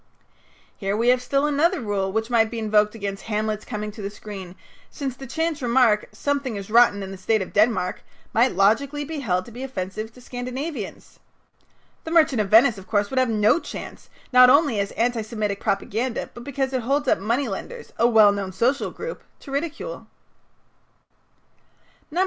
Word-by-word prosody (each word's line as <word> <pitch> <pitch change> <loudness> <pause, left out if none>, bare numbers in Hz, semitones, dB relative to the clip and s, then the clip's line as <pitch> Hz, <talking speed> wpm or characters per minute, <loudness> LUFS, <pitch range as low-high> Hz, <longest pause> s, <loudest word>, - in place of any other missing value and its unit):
Here 195 0 -2
we 235 +2 +2
have 250 0 +4
still 275 +3 +1
another 305 +5 +2
rule 200 -4 -2
which 220 +3 -2
might 225 -2 +3
be 230 - -6
invoked 215 -1 +2
against 200 -2 -5
Hamlet's 215 0 -2
coming 210 -2 -4
to 210 - -10
the 200 - -3
screen, 195 -3 -9 0.3
since 270 -4 -5
the 270 - -10
chance 320 +2 -2
remark, 235 -3 +3
"Something 280 -4 -2
is 200 +1 -7
rotten 230 -3 +5
in 190 - -7
the 195 - -9
state 215 +2 +1
of - - -11
Denmark," 210 -3 +2 0.3
might 240 +1 +3
logically 275 +10 +2
be 315 +1 -5
held 185 -8 -1
to - - -12
be 245 +3 -9
offensive 215 -4 -5
to 250 - -16
Scandinavians. 250 - -6 0.8
"The - - -6
Merchant 310 -8 +4
of 200 - -3
Venice," 225 0 +5
of 190 - -14
course, 205 -1 0
would 265 - +1
have 255 -2 +2
no 215 +6 +3
chance, - - -9 0.2
not 250 0 +8
only 285 -5 +4
as 200 0 -1
anti 235 0 0
Semitic 215 -2 -3
propaganda, 225 +5 -2
but 240 - -10
because 270 0 -2
it 255 - 0
holds 275 +4 0
up - - +3
money 235 +7 0
lenders, 465 - -7
a 235 - +5
well 220 -3 +6
known 200 -2 -3
social 245 +9 0
group, - - -7 0.2
to 275 - -10
ridicule. 320 - -4
230 Hz, 180 wpm, -23 LUFS, 210-265 Hz, 0.8 s, not